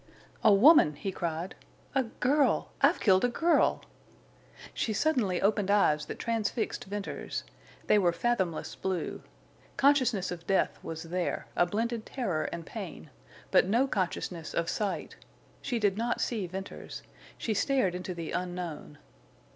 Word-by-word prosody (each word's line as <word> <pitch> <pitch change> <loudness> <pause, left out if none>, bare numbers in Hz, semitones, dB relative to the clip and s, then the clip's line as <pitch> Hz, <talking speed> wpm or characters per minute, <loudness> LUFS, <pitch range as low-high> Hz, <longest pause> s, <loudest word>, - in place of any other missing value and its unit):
"A - - +7
woman!" 200 - +7
he 195 +6 -4
cried. 170 0 -3 0.4
"A 270 - +3
girl!... 275 +5 +1
I've - - +4
killed 190 -3 +4
a - - +5
girl!" 335 +7 +2 0.9
She 220 - -1
suddenly 215 - +1
opened 200 -1 +1
eyes 150 -7 +3
that - - -6
transfixed 230 0 -2
Venters. 205 0 -5 0.4
They 210 - +4
were 175 -3 +3
fathomless 180 -3 -1
blue. 190 -2 -3 0.6
Consciousness 255 -10 +3
of 170 -1 -7
death 195 - +1
was 160 0 -6
there, 175 +1 -2
a 175 - +3
blended 225 +4 -2
terror 190 - -2
and 170 -1 -6
pain, 180 -7 -8 0.4
but - - +5
no 235 +7 +3
consciousness 180 - -3
of 170 0 0
sight. 205 -2 -3 0.4
She 250 -3 -2
did 205 -2 +1
not 235 +1 0
see 215 -6 -1
Venters. 190 +2 -7 0.3
She 225 - -1
stared 210 -3 +1
into 180 0 -5
the 165 -2 -5
unknown. 175 -4 -4
195 Hz, 140 wpm, -29 LUFS, 175-230 Hz, 0.9 s, A